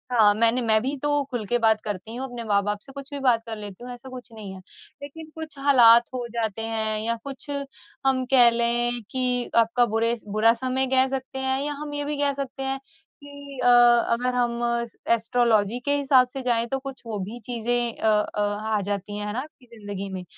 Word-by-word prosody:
हाँ, 215 -4 +5
मैंने 230 +3 +2
मैं 220 -2 +3
भी 270 +4 -2
तो 290 -1 +1
खुल 240 -4 -3
के 240 - +2
बात 220 -2 +3
करती 210 +2 -6
हूँ, 260 +2 -4
अपने 245 -2 -7
माँ 205 -2 +2
बाप 205 0 -2
से, 270 - -12
कुछ 275 0 -10
भी 285 - -4
बात 245 -4 +2
कर 225 -1 -6
लेती 205 +1 -9
हूँ, 250 - -8
ऐसा 245 +2 -11
कुछ 250 -2 -11
नहीं 210 -3 -9
है, 190 - -10 0.4
लेकिन 310 +2 -10
कुछ 320 -2 -8
हालात 240 -4 +6
हो 250 -1 -4
जाते 225 -2 -2
हैं 220 -1 -1
या 230 +1 +1
कुछ 275 0 -7 0.6
हम 260 -1 +2
कह 245 -2 +9
लें 240 +1 +1
कि 250 -1 +1
आपका 230 +1 +3
बुरे 230 +1 +2
बुरा 215 +3 +3
समय 260 +2 -1
कह 260 0 +4
सकते 265 0 -5
हैं 265 0 0
या 295 - -2
हम 295 -1 -6
ये 290 0 -3
भी 295 0 -3
कह 285 0 +1
सकते 270 -1 -6
हैं 270 0 -2 0.4
कि 285 -1 -11
अ, - - +3
अगर 240 0 +4
हम 240 -1 0 0.5
एस्ट्रोलॉज़ी 230 -1 +1
के 285 0 +2
हिसाब 270 -2 +4
से 265 +2 -7
जाएँ, 235 -2 0
तो 270 +3 -2
कुछ 270 -1 -9
वो 220 -3 -5
भी 210 +6 -6
चीज़ें 240 0 -2
अ - - -1
अ, 210 - -6
आ 205 +1 -1
जाती 200 +1 -4
हैं 210 - -4
है 210 - -4
ना 240 - -2
आपकी 270 -2 -11
ज़िंदगी 200 -2 -6
में 185 -1 -5
240 Hz, 220 wpm, -24 LUFS, 220-265 Hz, 0.6 s, कह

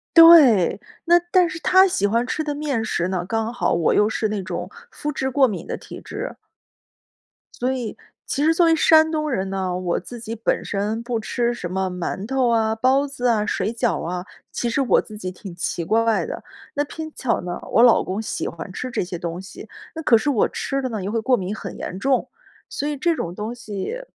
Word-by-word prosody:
对， 300 - +8 0.2
那 345 +1 +5
但 365 -1 +4
是 345 -2 -6
他 375 +3 +5
喜 205 - +1
欢 230 +3 +1
吃 310 - -2
的 295 -1 -3
面 280 -7 -2
食 180 -3 -1
呢 180 -2 -2
刚 225 +2 -1
好 245 - 0
我 170 -1 +2
又 210 - +4
是 220 -1 -1
那 205 -2 -2
种 - - -5 0.2
麸 300 - -4
质 265 -1 -2
过 265 +1 +4
敏 210 -6 -4
的 - - -3
体 - - -10
质。 - - -6 1.2
所 255 +1 +1
以， 245 -4 -4 0.3
其 285 - -1
实 320 +2 +4
作 345 +1 +4
为 330 0 +5
山 315 0 +5
东 305 -2 -1
人 190 -4 -1
呢， 185 -2 -2
我 180 -2 -1
自 240 +6 -8
己 225 0 -6
本 225 - -1
身 210 +3 -2
不 235 -1 -2
吃 240 +2 -1
什 180 -7 -6
么 190 0 -1
馒 180 +3 -4
头 260 -2 +1
啊、 220 -1 +2
包 265 +5 +2
子 250 -3 -2
啊、 215 -3 +2
水 210 - -1
饺 230 - 0
啊， 180 +2 -4 0.3
其 240 - -2
实 255 +4 +1
我 255 - +3
自 215 -1 -11
己 185 -3 -5
挺 185 -1 -10
奇 170 -1 -3
怪 225 +3 +2
的。 - - -6 0.3
那 290 - 0
偏 315 +2 -7
巧 245 -3 0
呢， 175 0 -4
我 230 - +4
老 240 -2 +6
公 190 +4 -3
喜 220 - -4
欢 170 +3 -8
吃 255 +5 -5
这 215 - -1
些 175 0 -5
东 170 +1 -5
西， 190 - -11 0.3
那 320 - -4
可 235 -6 +5
是 255 +7 -1
我 240 -7 +2
吃 275 0 -2
的 255 - -2
呢， 215 -4 -4
又 195 - -3
会 225 - 0
过 250 +2 +3
敏 190 +3 -3
很 195 -4 -7
严 185 - -5
重。 260 +5 +1 0.4
所 - - -4
以 295 -1 -2
这 335 +4 +1
种 170 - -4
东 215 +5 -5
西， 230 - -5
230 Hz, 240 characters per minute, -22 LUFS, 195-275 Hz, 1.2 s, 对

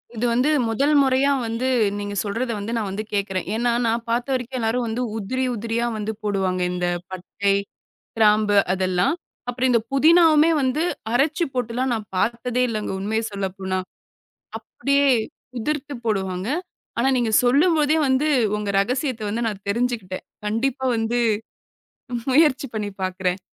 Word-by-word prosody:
இது 230 - -1
வந்து, 250 +5 +2 0.2
முதல் 280 +7 +2
முறையா 270 +1 +3 0.2
வந்து 230 +3 -2 0.3
நீங்க 205 0 -4
சொல்றதை 230 +4 -2
வந்து 220 +4 -4
நான் 215 -4 -1
வந்து 205 +3 -4
கேக்கிறேன். 195 -2 -1
ஏன்னா, 240 +1 +1
நான் 230 +1 0
பாத்த 240 +2 0
வரைக்கும் 255 0 -3
எல்லாரும் 235 +2 0
வந்து 225 +3 -2 0.2
உதிரி 255 +6 -2
உதிரியா 230 +2 -1
வந்து 215 0 -2
போடுவாங்க. 190 -3 0
இந்த 180 0 -1 0.2
பட்டை, 195 +2 -1 0.6
கிராம்பு 210 -1 +4 0.2
அதெல்லாம், 185 - +1 0.3
அப்புறம் 255 +1 +1
இந்த 235 - +4
புதினாவுமே 320 +2 +6
வந்து 260 +5 +1 0.3
அரைச்சு 285 +7 +2
போட்டுலாம் 250 +1 -1
நான் 215 -3 -5
பாத்ததே 240 +4 0
இல்லைங்க, 215 -3 -3
உண்மையை 220 +3 -1
சொல்லப்போனா. 190 -1 -3 0.8
அப்படியே 280 0 0 0.5
உதிர்த்து 295 +3 -3
போடுவாங்க. 190 -1 -1 0.5
ஆனா 265 +3 +3
நீங்க 235 -3 0
சொல்லும்போதே 300 +3 +3
வந்து, 265 +3 +2 0.3
உங்க 210 -1 -3
ரகசியத்தை 250 0 -2
வந்து 230 +2 -1
நான் 205 -3 -5
தெரிஞ்சுக்கிட்டேன். 225 -4 -2 0.2
கண்டிப்பா 260 +5 -1
வந்து, 225 +2 0 1.1
முயற்சி 290 -2 +4
பண்ணி 210 -1 -2
பாக்கிறேன். 185 0 -1
230 Hz, 135 wpm, -22 LUFS, 205-260 Hz, 1.1 s, புதினாவுமே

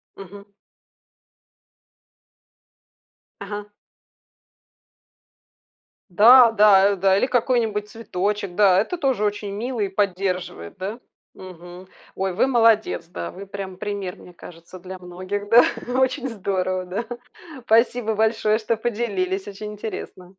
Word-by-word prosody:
Мгм. 200 +1 -12 2.9
Ага. 205 +1 -6 2.4
Да, 230 +5 +7
да, 205 -2 +5
э, - - -1
да. 190 +1 +2
Или - - +2
какой-нибудь 225 -4 0
цветочек. 200 -3 -3
Да, 195 -3 +5
это 290 - -2
тоже 265 -9 0
очень 205 -1 -2
мило 235 +4 -4
и 200 - +1
поддерживает, 185 - -3
да, 205 +6 -5 0.3
мгм. 180 0 -12 0.3
Ой, 190 -1 -2
вы 215 - +2
молодец. 225 -8 +2
Да, 85 - -6
вы 200 +1 -10
прям 195 -2 -7
пример, 200 -3 -5
мне 180 - -15
кажется, 170 +2 -13
для 185 +1 -9
многих. 185 +3 -6
Да, 235 +2 +7 0.4
очень 260 0 0
здорово, 185 -3 -2
да. 200 +6 -4 0.6
Спасибо 225 -1 +2
большое, 220 0 +1
что 230 +1 -1
поделились. 205 -5 -2
Очень 210 +1 -7
интересно. 200 -4 -8
205 Hz, 115 wpm, -22 LUFS, 185-220 Hz, 2.9 s, Да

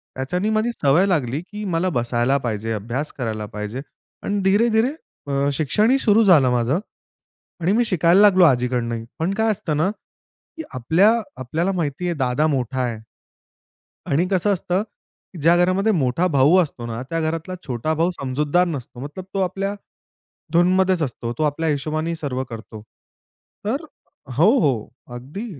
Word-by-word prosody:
त्याच्यानी 180 +11 -2
माझी 220 +2 +1
सवय 160 -1 +3
लागली 145 -5 0
की 210 +3 -8
मला 175 +2 0
बसायला 120 +3 +1
पाहिजे, 110 -1 -2
अभ्यास 120 +8 -4
करायला 110 -4 -3
पाहिजे 105 +4 -6 0.4
आणि 205 0 -1
धीरे-धीरे 220 +5 +3 0.4
अ, 140 +1 +1
शिक्षण 165 - +1
ही 270 - +4
सुरू 220 -1 +4
झालं 155 -10 +5
माझं 125 +7 +1 0.8
आणि 175 +4 +2
मी 240 +1 +3
शिकायला 180 0 +4
लागलो 190 -3 +6
आजीकडनं 125 -3 +1
ही. 115 0 -6
पण 175 +5 0
काय 220 +1 +1
असतं 155 -7 -2
ना 170 +5 +2
की - - -23 0.5
आपल्या 165 - +4 0.3
आपल्याला 165 +9 -1
माहिती 170 -1 -2
आहे 175 - 0
दादा 130 +3 +1
मोठा 130 -3 -1
आहे 120 -3 -2 1.1
आणि 165 +6 +1
कसं 195 +2 +2
असतं 185 +1 0
की 200 -4 -18
ज्या 170 +2 +5
घरामध्ये 190 +5 +2
मोठा 155 +2 +1
भाऊ 145 +2 +4
असतो 140 -8 -1
ना, 115 +1 -5
त्या 165 +5 -3
घरातला 165 +3 -3
छोटा 130 +5 -1
भाऊ 165 +3 +1
समजूतदार 150 +4 0
नसतो, 130 -6 -6
मतलब 150 +7 -7
तो 195 - 0
आपल्या 195 +2 -2 0.8
धूनमध्येच 185 0 +3
असतो. 120 -3 -3
तो - - -1
आपल्या 155 +2 0
हिशोबाने 155 +3 -1
सर्व 130 -4 -3
करतो. 110 -1 -9 0.8
तर 275 +8 -1 0.5
हो, 175 +9 +5
हो, 130 -9 0 0.3
अगदी. 145 - -7
160 Hz, 155 wpm, -21 LUFS, 130-185 Hz, 1.1 s, लागलो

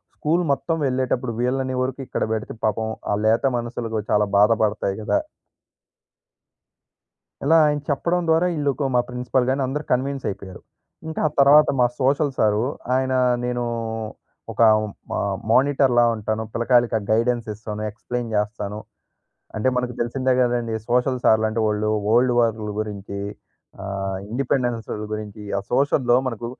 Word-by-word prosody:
School 165 +4 +1
మొత్తం 165 +4 -1
వెళ్ళేటప్పుడు 130 -1 -1
వీళ్ళని 130 +1 -1
వరకు 130 +1 -2
ఇక్కడ - - -2
పెడితే, 110 -1 -4
పాపం 110 +1 0 0.2
ఆ - - +2
లేత 115 +3 +3
మనసులకు 115 -2 -3
చాలా 105 0 +3
బాధపడతాయి 105 -2 +2
కదా! 105 - +1 2.2
ఇలా 160 +4 +5
ఆయన 150 0 +1
చెప్పడం 170 +5 0
ద్వారా 160 +2 +4
ఈళ్ళోక 145 -1 0
మా 125 - +5
ప్రిన్సిపల్ 125 +1 0
గాని 135 +1 0
అందరూ 145 +4 -3
కన్విన్స్ 135 +2 0
అయిపోయారు. 95 -2 -8 0.5
ఇంకా 160 - -5
ఆ - - -1
తర్వాత 145 +2 +7
మా 125 - +6
సోషల్ 140 +2 +2
సారు, 105 0 +2 0.3
ఆయన 130 0 0 0.3
నేను 125 0 -1 0.9
ఒక - - -2 0.5
మా - - -1 0.3
మానిటర్‌లా 130 -2 +4
ఉంటాను. 110 +1 -2
పిల్లకాయలకి 120 0 +2
ఆ - - -9
గైడెన్స్ 115 +1 +1
ఇస్తాను, 105 0 -7
ఎక్స్‌ప్లెయిన్ 120 +1 -5
చేస్తాను. 105 0 -2 0.8
అంటే 110 +4 +1
మనకు 125 0 -1
తెలిసిందే 130 +2 0
కదండీ! 120 -2 0
సోషల్ 125 +1 +1
సార్లు 110 0 +4
అంటే 110 +1 -2
వాళ్ళు 105 0 0 0.2
వల్డ్ 120 +3 +4
వార్ల 110 -2 0
గురించి 100 -2 -5 0.7
ఆహ్, 95 -1 -3
ఇండిపెండెన్స్ 120 -2 -1 0.3
గురించి, 105 0 -6 0.2
ఆ - - -2
సోషల్‍లో 130 -2 +3
మనకు 120 -2 -4
120 Hz, 135 wpm, -22 LUFS, 110-130 Hz, 2.2 s, తర్వాత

